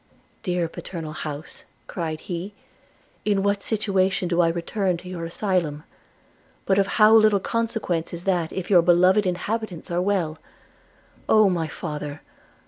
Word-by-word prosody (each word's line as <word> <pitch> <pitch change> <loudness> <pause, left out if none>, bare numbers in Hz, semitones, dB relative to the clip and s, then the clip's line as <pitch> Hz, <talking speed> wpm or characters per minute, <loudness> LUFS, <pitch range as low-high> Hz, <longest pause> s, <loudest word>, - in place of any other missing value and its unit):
'Dear 180 -3 -1
paternal 160 -1 -7
house,' 150 0 -7 0.2
cried 160 -3 -4
he, 185 +3 -5 0.7
'in 200 -2 +1
what 200 0 +1
situation 195 -4 0
do 170 0 +2
I 170 - +4
return 175 +2 -1
to 180 - -12
your 175 -2 -5
asylum! 165 -4 -1 0.4
– - - -35
but 195 0 +3
of 195 - +2
how 215 0 +7
little 215 -2 +6
consequence 225 -7 -2
is 170 0 -7
that 175 -4 0
if 190 +1 -5
your 180 -3 +7
beloved 180 +4 +4
inhabitants 185 0 -3
are 175 +1 +1
well! 180 -5 0 0.5
– - - -31
Oh, 215 -3 +6
my 165 -3 -1
father! 150 -2 -6
180 Hz, 150 wpm, -24 LUFS, 165-200 Hz, 0.7 s, how